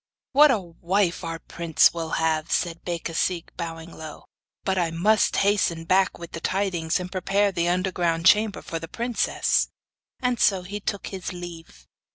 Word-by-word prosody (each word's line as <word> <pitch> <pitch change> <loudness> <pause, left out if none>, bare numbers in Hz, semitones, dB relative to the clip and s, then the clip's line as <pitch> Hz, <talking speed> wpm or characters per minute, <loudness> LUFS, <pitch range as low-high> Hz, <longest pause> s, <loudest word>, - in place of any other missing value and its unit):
'What 295 +2 +7
a 260 - +4
wife 180 +1 -1
our 165 -1 -4
prince 165 -1 +2
will 165 -1 -4
have!' 160 -1 0
said 170 -1 -1
Becasigue 170 0 -2
bowing 165 -1 -6
low; 155 -1 -9 0.4
'but 190 -1 0
I 170 -2 +1
must 200 +7 +2
hasten 190 -5 +1
back 190 +2 +2
with 170 -1 -9
the - - -5
tidings, 180 -3 0
and 180 - -4
to - - -27
prepare 195 +2 +1
the 170 -2 0
underground 175 -2 0
chamber 210 +1 +4
for 165 - -4
the 165 - -7
princess.' 235 +6 0 0.5
And 250 -2 0
so 190 -3 +3
he 205 +3 -5
took 200 0 -3
his 185 -2 -4
leave. 165 - -10
175 Hz, 170 wpm, -25 LUFS, 165-195 Hz, 0.5 s, What